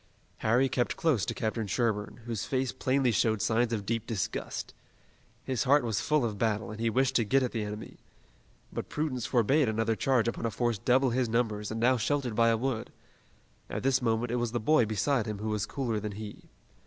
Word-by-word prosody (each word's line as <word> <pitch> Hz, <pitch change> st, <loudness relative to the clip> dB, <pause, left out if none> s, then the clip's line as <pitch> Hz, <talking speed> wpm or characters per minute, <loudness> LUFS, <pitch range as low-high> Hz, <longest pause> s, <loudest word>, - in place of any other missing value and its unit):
Harry 120 Hz, +5 st, +3 dB
kept 125 Hz, -2 st, -1 dB
close 150 Hz, -, +1 dB
to -, -, -1 dB
Captain 110 Hz, -1 st, -2 dB
Sherburne, 110 Hz, 0 st, -1 dB
whose 115 Hz, -5 st, -3 dB
face 130 Hz, -1 st, -1 dB
plainly 130 Hz, -1 st, +1 dB
showed 110 Hz, +1 st, +2 dB
signs 115 Hz, +2 st, +1 dB
of 105 Hz, -3 st, -2 dB
deep 115 Hz, +1 st, -2 dB
disgust. 110 Hz, -7 st, -3 dB, 0.7 s
His 130 Hz, -1 st, -1 dB
heart 145 Hz, +1 st, +5 dB
was 110 Hz, -4 st, -1 dB
full 150 Hz, -4 st, +2 dB
of 105 Hz, -3 st, -4 dB
battle 110 Hz, -2 st, 0 dB
and 110 Hz, -, -8 dB
he 115 Hz, 0 st, +1 dB
wished 130 Hz, +3 st, +1 dB
to 115 Hz, -, +2 dB
get 135 Hz, +5 st, +2 dB
at 125 Hz, -, -1 dB
the 115 Hz, -, -2 dB
enemy. 105 Hz, +1 st, -7 dB, 0.8 s
But -, -, -5 dB
prudence 140 Hz, -6 st, -2 dB
forbade 130 Hz, +2 st, +3 dB
another 110 Hz, +1 st, 0 dB
charge 125 Hz, -1 st, +2 dB
upon 115 Hz, 0 st, -1 dB
a -, -, 0 dB
force 115 Hz, 0 st, -1 dB
double 130 Hz, +3 st, +3 dB
his 125 Hz, -1 st, 0 dB
numbers 110 Hz, -3 st, 0 dB
and 110 Hz, -, -4 dB
now 125 Hz, +2 st, +4 dB
sheltered 130 Hz, +1 st, 0 dB
by 115 Hz, +1 st, +4 dB
a 115 Hz, -, +3 dB
wood. 120 Hz, -1 st, -2 dB, 0.8 s
At -, -, -4 dB
this 130 Hz, 0 st, +2 dB
moment 115 Hz, 0 st, 0 dB
it 125 Hz, -, 0 dB
was 120 Hz, -1 st, -1 dB
the 120 Hz, -, 0 dB
boy 120 Hz, 0 st, +3 dB
beside 110 Hz, +3 st, 0 dB
him 105 Hz, -1 st, -3 dB
who 110 Hz, +2 st, -3 dB
was 105 Hz, -1 st, -1 dB
cooler 120 Hz, -6 st, -2 dB
than 105 Hz, 0 st, -5 dB
he. 105 Hz, 0 st, -9 dB
115 Hz, 210 wpm, -29 LUFS, 110-130 Hz, 0.8 s, heart